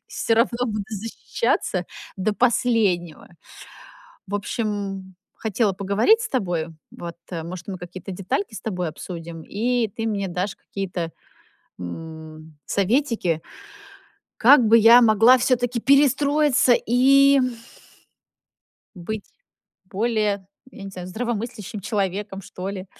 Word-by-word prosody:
всё 225 - 0
равно 235 +1 +1
буду 215 -3 -3
защищаться 225 - -2 0.3
до 205 +2 -1
последнего. 215 -9 +1 1.0
В 200 - -2
общем, 200 -3 -4 0.2
хотела 215 -2 0
поговорить 205 - +3
с 440 - -4
тобою 175 -9 -2 0.2
вот, 170 -1 -8 0.2
э, 165 -2 -4
может 175 +3 -8
мы 190 - -5
какие-то 180 +2 -8
детальки 195 +4 -3
с - - -7
тобой 180 -5 -3
обсудим, 165 0 -8
и 235 +2 0
ты 225 +3 -5
мне 200 -2 -1
дашь 180 +3 -3
какие-то, 180 -4 -5 0.7
м, 155 - -9
советики. 205 - 0 1.0
Как 250 0 +7
бы 225 +2 +6
я 230 +2 +8
могла 230 +2 +6
все-таки 245 -1 +1
перестроиться 280 -1 +4
и, 275 +4 +5
м 255 -2 0 1.4
быть 205 +4 -5 0.6
более, 205 -1 -1 0.3
я 215 - -11
не - - -6
знаю, 180 -1 -8
здравомыслящим 220 0 -4
человеком, 195 -1 -2
что 185 +1 -6
ли. 190 -1 -7
205 Hz, 115 wpm, -23 LUFS, 185-235 Hz, 1.4 s, я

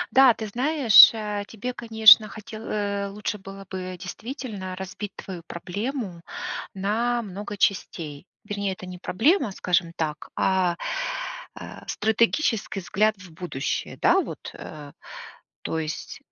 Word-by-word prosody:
Да, 265 -3 +8
ты 220 - -5
знаешь, 255 +1 +8
э, 210 -2 -3
тебе, 240 +3 -5
конечно, 220 -2 +7
хотел 215 +1 -9
э, 200 -2 -2
лучше 210 +1 -4
было 195 +1 -10
бы 185 -1 -5
действительно 205 - -6
разбить 190 +2 -6
твою 185 -3 -7
проблему 200 +1 -4 0.5
на 230 +5 0
много 205 +1 -7
частей. 165 -5 -1 0.2
Вернее, 200 -2 -2
это 185 - -10
не 180 0 -8
проблема, 255 - +2
скажем 175 -2 0
так, 155 -2 -3
а, 185 -2 +2 0.8
э, - - -9
стратегический 220 0 +1
взгляд 215 +4 +2
в 185 -2 -13
будущее, 160 -5 -3
да - - +6
вот, - - -7
э, 150 -2 -9 0.7
то 160 - -2
есть 155 -1 -5
200 Hz, 130 wpm, -25 LUFS, 185-220 Hz, 0.8 s, Да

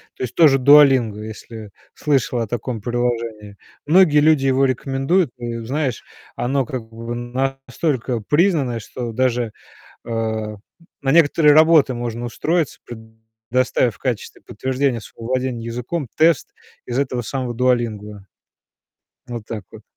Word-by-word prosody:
То - - -6
есть 125 - -5
то 165 -2 +7
же 135 -1 +3
"Дуолинго", 130 -6 +5
если 110 -1 -9 0.2
слышала 130 -5 0
о - - -5
таком 120 -1 -4
приложении, 115 -4 -3 0.3
многие 155 -2 +5
люди 150 -2 +4
его 135 +1 +3
рекомендуют. 135 +5 0
Ну, 115 -1 -5
знаешь, 135 -2 -2 0.3
оно 135 +1 0
как 125 -2 -5
бы 115 +1 -6
настолько 130 +1 -2
признанное, 145 - +1
что 120 +3 -6
даже, 120 -2 0 0.6
э, - - -7 0.9
на 135 0 +1
некоторые 155 -2 +5
работы 155 -3 +5
можно 120 0 -4
устроиться, 160 +6 -1
предоставив 110 +1 -2
в - - -27
качестве 125 -5 -4
подтверждения 130 +1 -2
своего 115 +2 -11
владения 130 -2 -2
языком 125 +6 -4
тест 160 -3 +3 0.3
из 125 +2 -3
этого 130 -3 -1
самого 125 0 -4
"Дуолинго". 110 -5 -1 1.0
Вот 120 -3 -6
так 105 -3 -6
вот. 110 -1 -12
125 Hz, 130 wpm, -20 LUFS, 115-135 Hz, 1.0 s, то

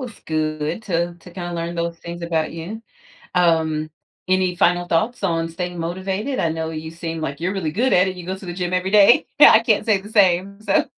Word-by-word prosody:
was 245 -4 -8
good 155 +3 -2
to 170 -2 -1
to 175 +1 -15
kinda 175 -1 -6
learn 170 0 -4
those 170 0 -3
things 170 0 -8
about 165 -2 -1
you. 175 +8 -7 0.5
Um, 160 -3 +2 0.4
any 185 -1 +1
final 175 0 +2
thoughts 210 +7 0
on 165 -2 0
staying 175 +1 -5
motivated? 190 +9 -3
I 165 - +1
know 160 0 -3
you 160 0 -6
seem 165 -1 -5
like 145 -2 -4
you're 180 +3 -1
really 175 -6 -2
good 240 +9 +1
at 185 +1 +4
it. 185 - -3
You 180 -1 -9
go 190 +1 -3
to 190 - -11
the 175 - -5
gym 180 0 -3
every 185 +1 0
day. 210 +3 +6
I 220 -6 +9
can't 225 -1 +1
say 215 -3 +3
the 205 - -12
same. 200 -1 +2
So 205 -2 +2
175 Hz, 220 wpm, -21 LUFS, 165-195 Hz, 0.5 s, I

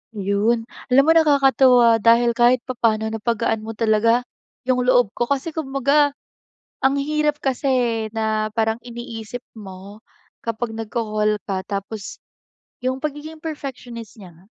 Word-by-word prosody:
Ayun, 205 +3 +1 0.2
alam 255 +2 +5
mo 320 - +4
nakakatuwa 270 -7 +5
dahil 235 +2 +4
kahit 240 +1 +3
papaano 220 -3 0
napagaan 225 0 -1
mo 220 +1 -7
talaga 230 +2 +2 0.4
'yung 255 0 +1
loob 245 -5 +4
ko 240 - -2
kasi 280 +4 -1
kumbaga, 285 -1 +1 0.7
ang 270 +1 +3
hirap 300 +1 0
kasi, 270 +1 -1
eh, 240 -4 +1
na 220 -1 0
parang 225 0 0
iniisip 240 -1 -7
mo, 195 0 -11 0.4
kapag 230 0 -3
nagko-call 215 -1 -1
ka 195 -2 -1
tapos 200 0 -6 0.6
'yung 255 +1 -1
pagiging 305 +1 -5
perfectionist 255 -8 -7
niya 180 -3 -12
nga. 170 +3 -22
235 Hz, 130 wpm, -21 LUFS, 220-265 Hz, 0.7 s, alam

